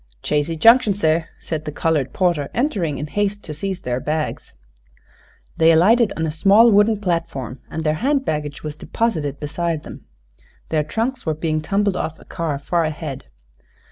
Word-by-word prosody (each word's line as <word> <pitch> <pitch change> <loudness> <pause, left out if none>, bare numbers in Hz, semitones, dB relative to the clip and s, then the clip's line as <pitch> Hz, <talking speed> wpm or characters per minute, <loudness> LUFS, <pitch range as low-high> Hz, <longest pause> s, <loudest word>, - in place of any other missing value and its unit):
"Chazy 150 +2 0
Junction, 225 +1 +6
seh," 160 -4 +1
said 155 -1 -4
the 150 - -3
colored 150 -3 0
porter, 170 -7 0
entering 195 - 0
in 150 - -4
haste 205 +5 -2
to 155 - -6
seize 185 +4 -4
their 125 0 -2
bags. 155 +3 -3 1.0
They 165 0 +6
alighted 205 +7 +4
on 160 - 0
a 155 - -1
small 205 +8 +5
wooden 210 +1 +4
platform 165 - -3
and 160 - -4
their 155 -1 +2
hand 275 +1 +1
baggage 150 - -3
was 150 -1 -5
deposited 155 -8 -2
beside 160 +1 -2
them. - - -11 0.6
Their 155 -1 +1
trunks 225 - -3
were 155 - +1
being 155 0 -1
tumbled 200 +4 0
off 160 - -3
a - - -16
car 160 -4 -3
far 170 +4 0
ahead. 155 -3 -5
160 Hz, 170 wpm, -21 LUFS, 150-200 Hz, 1.0 s, Junction